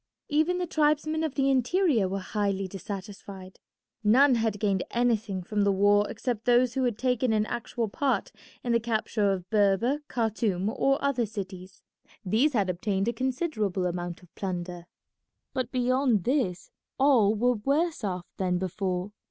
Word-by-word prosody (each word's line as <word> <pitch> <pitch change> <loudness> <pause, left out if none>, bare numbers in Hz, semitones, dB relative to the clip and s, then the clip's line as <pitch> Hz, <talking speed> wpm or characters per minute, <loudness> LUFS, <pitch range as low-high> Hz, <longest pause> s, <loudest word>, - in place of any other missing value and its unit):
Even 315 +4 +2
the 360 - -1
tribesmen 310 0 +1
of 310 -4 -2
the 275 -1 +2
interior 265 - +2
were 195 - -2
highly 195 0 -2
dissatisfied. 195 0 -8 0.4
None 255 +6 +5
had 220 -3 0
gained 195 -3 +1
anything 220 -6 0
from 210 +3 -1
the 200 0 +3
war 205 +1 +3
except 240 -4 -3
those 245 0 +4
who 260 0 0
had 235 -4 -1
taken 250 -1 +1
an 215 -1 +2
actual 235 0 -3
part 245 0 -1 0.3
in 240 - -1
the 235 - +4
capture 220 -3 0
of 185 -2 -3
Berber, 215 +6 +2
Khartoum, 215 -4 -1
or 275 +4 +1
other 255 -5 +1
cities. 190 -2 -8 0.4
These 235 +11 +2
had 205 -5 +1
obtained 195 +3 -1
a - - -2
considerable 235 - -1
amount 175 0 -4
of 175 - -20
plunder. 175 -2 -5 0.7
But 255 -2 -2
beyond 255 -4 +2
this 235 -9 -1 0.3
all 245 -7 +4
were 245 +3 +2
worse 280 +7 0
off 180 -3 -3
than 180 -2 0
before. 185 +1 -2
220 Hz, 155 wpm, -27 LUFS, 195-255 Hz, 0.7 s, None